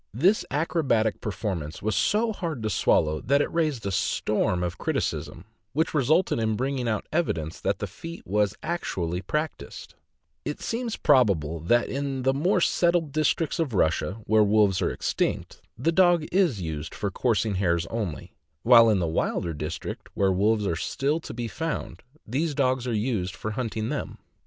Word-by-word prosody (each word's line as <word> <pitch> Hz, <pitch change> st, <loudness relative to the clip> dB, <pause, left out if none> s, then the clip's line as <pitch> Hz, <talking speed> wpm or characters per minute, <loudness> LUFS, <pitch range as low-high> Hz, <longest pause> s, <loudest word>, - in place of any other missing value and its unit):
This 185 Hz, -, +3 dB
acrobatic 140 Hz, -, +1 dB
performance 95 Hz, -8 st, -4 dB
was 110 Hz, +1 st, 0 dB
so 220 Hz, +2 st, +2 dB
hard 165 Hz, -, -4 dB
to 110 Hz, -, -1 dB
swallow 75 Hz, -3 st, +2 dB
that 140 Hz, +3 st, +2 dB
it -, -, -1 dB
raised 155 Hz, -9 st, 0 dB
a 100 Hz, -, -1 dB
storm 95 Hz, -1 st, 0 dB
of 90 Hz, -, -4 dB
criticism, 80 Hz, -, -2 dB, 0.3 s
which 160 Hz, +4 st, 0 dB
resulted 155 Hz, +2 st, +2 dB
in 110 Hz, -1 st, +1 dB
bringing 130 Hz, +1 st, -1 dB
out 110 Hz, -, -1 dB
evidence 80 Hz, -, -1 dB
that -, -, 0 dB
the -, -, -3 dB
feat 165 Hz, +1 st, -9 dB
was 105 Hz, +1 st, +1 dB
actually 90 Hz, -, -2 dB
practiced; 150 Hz, -, -4 dB, 0.5 s
It -, -, -4 dB
seems 230 Hz, -1 st, -3 dB
probable 95 Hz, -, +3 dB
that 120 Hz, +10 st, +2 dB
in 135 Hz, -1 st, -3 dB
the 135 Hz, +1 st, +3 dB
more 175 Hz, +7 st, +2 dB
settled 170 Hz, -3 st, +2 dB
districts 155 Hz, +1 st, 0 dB
of 145 Hz, -9 st, -1 dB
Russia, 85 Hz, +1 st, +1 dB
where 110 Hz, 0 st, +4 dB
wolves 105 Hz, -2 st, +3 dB
are -, -, +2 dB
extinct, -, -, -2 dB, 0.2 s
the 135 Hz, +8 st, +1 dB
dog 175 Hz, -2 st, +4 dB
is 175 Hz, -, +2 dB
used 80 Hz, -3 st, -5 dB
for 100 Hz, -2 st, -2 dB
coursing 110 Hz, 0 st, +1 dB
hares 85 Hz, -3 st, +1 dB
only; 105 Hz, -9 st, -4 dB, 0.3 s
while 115 Hz, -1 st, +7 dB
in 105 Hz, -, +3 dB
the 85 Hz, -3 st, 0 dB
wilder 80 Hz, +1 st, -1 dB
districts, 75 Hz, +2 st, -6 dB
where 95 Hz, -1 st, +2 dB
wolves 105 Hz, +3 st, +2 dB
are 85 Hz, -, 0 dB
still 140 Hz, -, -1 dB
to -, -, -8 dB
be 120 Hz, 0 st, -4 dB
found, 165 Hz, +8 st, -4 dB, 0.2 s
these 145 Hz, +6 st, -1 dB
dogs 130 Hz, -2 st, +1 dB
are -, -, -1 dB
used 105 Hz, -5 st, -1 dB
for 110 Hz, -, -4 dB
hunting 110 Hz, -1 st, -3 dB
them. -, -, -4 dB
115 Hz, 170 wpm, -26 LUFS, 95-155 Hz, 0.5 s, while